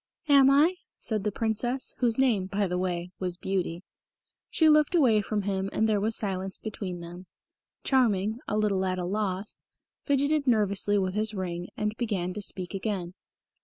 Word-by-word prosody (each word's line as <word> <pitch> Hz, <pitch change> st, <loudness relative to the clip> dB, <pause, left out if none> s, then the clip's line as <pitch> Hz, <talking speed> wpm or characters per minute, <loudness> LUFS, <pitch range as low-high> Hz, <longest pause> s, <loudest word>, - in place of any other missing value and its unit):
"Am 275 Hz, -2 st, +7 dB
I?" 310 Hz, +7 st, +4 dB, 0.2 s
said 215 Hz, -3 st, -2 dB
the 210 Hz, -, 0 dB
Princess, 230 Hz, +5 st, -2 dB
whose 235 Hz, -3 st, +2 dB
name, 230 Hz, -8 st, +2 dB
by 200 Hz, +1 st, 0 dB
the 180 Hz, -1 st, -2 dB
way, 180 Hz, -1 st, -2 dB
was 180 Hz, -2 st, -3 dB
Beauty. 180 Hz, -2 st, -2 dB, 0.7 s
She 320 Hz, -, +3 dB
looked 305 Hz, +2 st, +4 dB
away 240 Hz, -10 st, +4 dB
from 205 Hz, 0 st, -2 dB
him 195 Hz, -1 st, -1 dB
and 220 Hz, -, +1 dB
there 215 Hz, -2 st, +2 dB
was 220 Hz, +2 st, 0 dB
silence 190 Hz, -2 st, -2 dB
between 195 Hz, -5 st, -6 dB
them. 175 Hz, +2 st, -10 dB, 0.6 s
Charming, 220 Hz, -4 st, +2 dB
a 210 Hz, -, -1 dB
little 205 Hz, -3 st, +1 dB
at 185 Hz, -1 st, -1 dB
a 180 Hz, -, -2 dB
loss, 195 Hz, +1 st, -2 dB, 0.4 s
fidgeted 285 Hz, +1 st, +1 dB
nervously 205 Hz, -3 st, +2 dB
with 185 Hz, -2 st, 0 dB
his 215 Hz, +1 st, 0 dB
ring, 175 Hz, -2 st, -4 dB
and 210 Hz, 0 st, -1 dB
began 195 Hz, -7 st, -2 dB
to 210 Hz, -, -5 dB
speak 185 Hz, -2 st, -3 dB
again. 190 Hz, -3 st, -3 dB
205 Hz, 170 wpm, -28 LUFS, 185-230 Hz, 0.7 s, Am